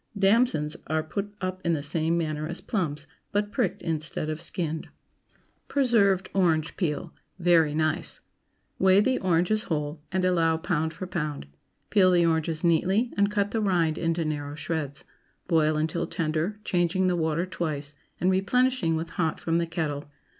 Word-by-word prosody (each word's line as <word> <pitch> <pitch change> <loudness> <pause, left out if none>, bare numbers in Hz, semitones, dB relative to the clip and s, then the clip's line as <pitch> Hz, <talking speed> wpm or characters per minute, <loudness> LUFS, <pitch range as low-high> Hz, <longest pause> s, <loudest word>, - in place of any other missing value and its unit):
DAMSONS 195 -6 +3
Are 155 0 0
put 200 +6 -4
up 185 0 -3
in 170 - +2
the 145 -3 -2
same 160 +3 0
manner 155 -2 -2
as 175 - -4
plums, 155 -8 -2 0.3
but 205 0 0
pricked 225 -7 -1
instead 155 -1 -2
of 155 - -5
skinned. 160 -4 -3 0.8
PRESERVED 210 -9 +3
ORANGE 165 -5 +2
PEEL. 150 -6 -2 0.2
(Very 165 -4 +3
nice.) 155 +2 0
✠ - - -33 0.6
Weigh 190 +1 +6
the 255 +5 +2
oranges 185 +4 +2
whole, 150 -1 -3
and 185 0 +1
allow 165 -3 +3
pound 160 -2 -1
for 165 +3 -6
pound. 155 - -3 0.5
Peel 190 -3 +5
the 175 -2 +4
oranges 160 0 0
neatly 190 +8 +2
and 200 0 +3
cut 205 -1 0
the 225 - 0
rind 170 -6 +1
into 165 0 0
narrow 145 -1 -3
shreds. 155 -3 -4 0.4
Boil 155 -3 +3
until 160 +2 -1
tender, 160 +5 -1
changing 180 0 +1
the 180 -1 +2
water 160 +1 0
twice, 155 -5 -4 0.3
and 185 +2 +3
replenishing 200 -1 +2
with 165 +1 -4
hot 165 -2 -1
from 165 0 0
the 170 - -1
kettle. 155 -4 -3
170 Hz, 160 wpm, -27 LUFS, 155-190 Hz, 0.8 s, Weigh